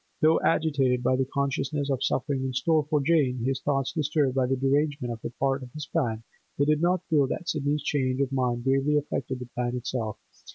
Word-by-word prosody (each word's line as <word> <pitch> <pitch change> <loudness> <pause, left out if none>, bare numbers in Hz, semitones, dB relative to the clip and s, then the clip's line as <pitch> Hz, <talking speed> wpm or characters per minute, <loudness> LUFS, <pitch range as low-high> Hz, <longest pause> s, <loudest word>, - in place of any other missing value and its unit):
Though 155 +1 +4
agitated 135 -6 +2
by 130 - +3
the 130 0 0
consciousness 140 +1 -1
of 135 -1 -1
suffering 135 0 0
in 130 -1 -2
store 155 +3 +2
for 150 -2 +2
Jane, 135 -5 +2
his 135 0 -1
thoughts 135 -2 0
disturbed 150 -4 +1
by 130 -1 +1
the 135 - +1
derangement 140 -1 0
of 115 - -11
a - - -3
part 135 +2 -1
of 125 -1 -9
his 150 -2 -6
plan, 115 -8 -1 0.3
he 140 - +3
did 150 +1 +2
not 180 +1 +1
feel 145 -4 +3
that 175 - -4
Sidney's 150 -1 -1
change 130 -3 0
of 140 -1 0
mind 125 -3 0
gravely 135 +3 +2
affected 135 -3 -2
the 125 - -7
plan 125 0 -2
itself. 120 -3 -3
135 Hz, 210 wpm, -27 LUFS, 130-150 Hz, 0.3 s, Though